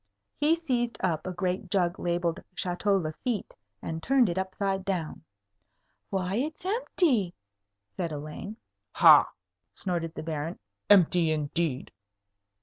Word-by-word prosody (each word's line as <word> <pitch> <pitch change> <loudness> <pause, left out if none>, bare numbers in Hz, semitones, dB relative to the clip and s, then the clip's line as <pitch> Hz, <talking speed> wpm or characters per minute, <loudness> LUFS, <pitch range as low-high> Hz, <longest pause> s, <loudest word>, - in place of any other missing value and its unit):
He 300 +3 +4
seized 250 -8 -1
up 165 -2 -1
a - - -2
great 180 +1 -2
jug 180 -2 +1
labelled 175 -1 -1
"Château 190 +3 +1
Lafitte," 205 - -3 0.3
and 160 0 -4
turned 255 0 +3
it 170 - -3
upside 190 0 -2
down. 180 -6 -3 0.9
"Why, 190 +1 -1
it's 305 +7 -3
empty!" 335 - +1 0.6
said 170 - -3
Elaine. 155 +8 -6 0.4
"Ha!" - - +7 0.5
snorted 170 -3 -3
the - - -5
Baron; 160 +1 -4 0.3
"empty 180 -4 +5
indeed." 150 -2 -1
185 Hz, 120 wpm, -28 LUFS, 165-210 Hz, 0.9 s, Ha